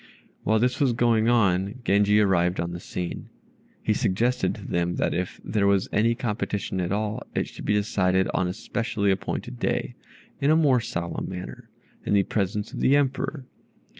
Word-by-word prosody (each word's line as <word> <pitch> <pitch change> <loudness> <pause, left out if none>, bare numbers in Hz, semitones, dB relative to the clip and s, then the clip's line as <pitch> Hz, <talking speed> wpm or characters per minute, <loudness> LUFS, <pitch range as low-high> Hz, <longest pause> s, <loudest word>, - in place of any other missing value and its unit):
While 110 +2 +3
this 125 +3 +1
was 135 -4 +3
going 115 -1 +3
on, 100 -2 +2
Genji 105 +1 +4
arrived 90 -3 +2
on 85 0 -2
the 85 - -5
scene. 90 -1 -5 0.5
He - - +2
suggested 120 +7 +1
to 105 -5 -10
them 85 0 0
that - - 0
if 90 +1 -3
there 105 -2 +1
was 100 -1 +2
any 115 +2 +2
competition 105 -5 -2
at 90 +1 -2
all 105 +1 -1
it - - 0
should - - -10
be 105 - +2
decided 95 -2 +2
on 95 - +1
a 90 - -2
specially 110 -1 -1
appointed 95 -9 -3
day, - - -1 0.5
in 140 - +2
a 155 - +6
more 145 -6 +4
solemn 85 -6 -4
manner, 90 -1 -8 0.3
in - - -1
the 100 - +4
presence 105 +1 -2
of - - -5
the 135 - +4
Emperor. 140 0 0
105 Hz, 180 wpm, -25 LUFS, 95-115 Hz, 0.5 s, a